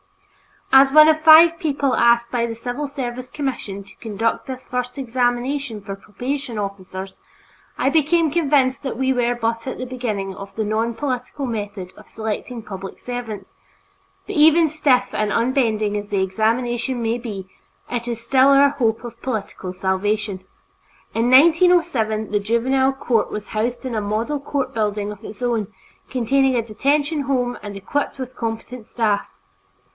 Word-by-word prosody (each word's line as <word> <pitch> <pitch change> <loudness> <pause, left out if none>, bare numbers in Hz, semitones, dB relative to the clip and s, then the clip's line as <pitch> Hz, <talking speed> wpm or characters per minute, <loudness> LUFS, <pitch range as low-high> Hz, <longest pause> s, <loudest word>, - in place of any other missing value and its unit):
As 270 0 +7
one 305 +1 +8
of 310 0 +3
five 325 +1 +8
people 280 -4 0
asked 235 0 +3
by 235 -1 0
the 230 - -5
civil 245 +5 -4
service 255 -3 -5
commission 250 -9 -4
to 195 - -15
conduct 225 0 -2
this 260 -1 -7
first 250 +1 -3
examination 250 0 -1
for 200 -1 -7
probation 245 +5 -5
officers, 195 -1 -6 0.6
I 265 - +2
became 320 +1 +2
convinced 275 -5 +2
that 265 -5 -4
we 265 0 +1
were 245 -1 +1
but 230 0 -2
at 260 - -4
the 255 - -4
beginning 220 -7 -3
of 195 +1 -10
the 220 - -1
nonpolitical 235 +5 -2
method 205 -5 -5
of - - -16
selecting 220 +2 -5
public 195 -2 -8
servants, 230 -6 -6 0.7
but 410 - -6
even 320 +1 +6
stiff 285 -4 +2
and 210 0 -1
unbending 230 -4 +1
as 205 0 -6
the 200 -2 +1
examination 235 +5 0
may 230 +2 0
be, 205 -6 -6 0.4
it 240 -1 -3
is 235 -1 -4
still 265 0 +4
our 280 0 +6
hope 230 -5 0
of 240 - -9
political 210 -6 -4
salvation. 195 +2 -1 0.7
In 230 +2 +1
1907, 270 - +4
the 205 - +2
Juvenile 260 +6 +1
Court 240 -4 0
was 210 0 -6
housed 235 +4 -2
in 255 - -3
a 215 - -1
model 220 +8 -1
court 275 -2 -3
building 210 -2 -1
of 210 +1 -11
its 215 +3 -8
own, 230 -4 0 0.4
containing 265 +1 +2
a 235 - +2
detention 285 +7 0
home 250 -3 0
and 205 -1 -7
equipped 285 +11 -2
with 260 -1 -5
a - - -31
competent 230 0 -5
staff. 215 -4 0
240 Hz, 160 wpm, -21 LUFS, 215-270 Hz, 0.7 s, one